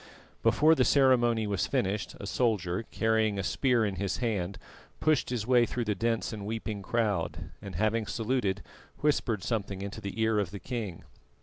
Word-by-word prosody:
Before 155 +2 +5
the - - +3
ceremony 120 -5 +4
was 100 -3 0
finished, 95 -1 -1
a - - -6
soldier, 100 -3 0
carrying 110 -2 +1
a 95 - -1
spear 120 +3 +2
in 100 -2 -2
his 100 -1 -1
hand, 100 -6 -1 0.4
pushed 155 -3 +2
his 120 -4 -2
way 120 -1 +4
through 120 -1 -2
the 105 - +1
dense 115 +2 -1
and 105 -2 -6
weeping 110 -1 -4
crowd, 105 -5 -1
and 100 -4 -8
having 110 +4 +1
saluted, 115 -4 -1 0.4
whispered 120 -9 +1
something 100 -4 -2
into 100 +2 -6
the 100 +1 -5
ear 110 -1 +3
of 100 -4 -1
the 100 +2 -7
king. 105 -3 -5
110 Hz, 175 wpm, -29 LUFS, 100-120 Hz, 0.4 s, Before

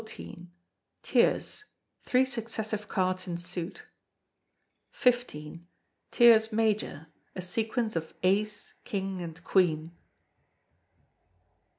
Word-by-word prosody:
Tierce, 425 - +1 0.4
three 255 +1 +3
successive 220 -4 -3
cards 185 -1 0
in 170 -1 -3
suit. 175 +1 -4 1.1
xv. 170 - 0 0.5
Tierce 225 -2 +6
Major, 215 -8 0 0.3
a 185 - -4
sequence 220 +3 -1
of 160 -1 -4
ace, 205 +3 0
king, 195 -2 -3
and 165 -1 -8
queen. 165 -4 +2
200 Hz, 80 wpm, -29 LUFS, 175-225 Hz, 1.1 s, Tierce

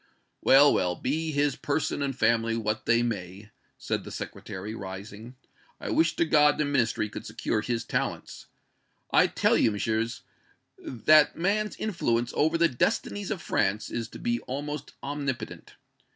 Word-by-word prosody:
"Well, 140 +2 +7
well, 90 -1 +1
be 155 - -2
his 145 -2 +1
person 145 0 -1
and 135 -2 -2
family 115 -1 +2
what 110 -1 -2
they 115 +1 +4
may," 100 -2 -5 0.3
said - - -3
the - - -9
Secretary, 100 +3 -6
rising, 100 +4 -8 0.4
"I - - -4
wish 160 0 +2
to 170 - +2
God 150 -2 +4
the 150 - +1
Ministry 120 -6 +1
could - - -8
secure 105 - -2
his 115 +1 -2
talents. - - -3 0.6
I - - +5
tell - - +2
you, - - +4
Messieurs, 110 +2 -2 0.6
that 150 +5 +4
man's 210 +4 0
influence 120 - -1
over 160 +2 +2
the 170 0 +4
destinies 205 - -1
of 195 -7 -4
France 105 +1 0
is 115 -2 -3
to - - -11
be 120 0 -1
almost 145 +2 -5
omnipotent. 140 -2 -5
120 Hz, 150 wpm, -27 LUFS, 110-150 Hz, 0.6 s, Well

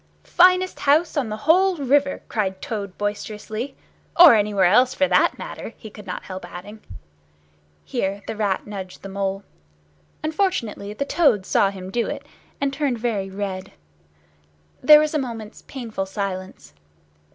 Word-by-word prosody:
"Finest 365 +1 +4
house 300 +4 +2
on 270 -7 0
the 215 - -4
whole 370 +3 +4
river," 280 0 +1
cried 190 -4 -2
Toad 200 -4 -5
boisterously. 215 +4 -4 0.4
"Or 345 -7 +11
anywhere 205 -3 +2
else, 245 +8 +4
for 280 - +2
that - - +3
matter," - - -7
he 220 - -11
could 210 -1 -12
not 180 - -5
help 185 -1 -7
adding. 205 +5 -9 1.1
Here 195 - -2
the 225 - -5
Rat 205 -3 -1
nudged 195 -3 -8
the 195 - -7
Mole. 195 0 -3 0.8
Unfortunately 310 - -1
the 280 - -3
Toad 280 - +2
saw 195 - +3
him 190 -1 -8
do 235 +2 0
it, - - -5 0.3
and 280 -1 -1
turned 275 -4 -1
very 215 -4 -2
red. 190 -1 -5 1.1
There 300 +3 +9
was 305 0 -1
a 305 - +1
moment's 225 -5 -6
painful 225 -7 -5
silence. 190 - -5
215 Hz, 150 wpm, -22 LUFS, 195-280 Hz, 1.1 s, Or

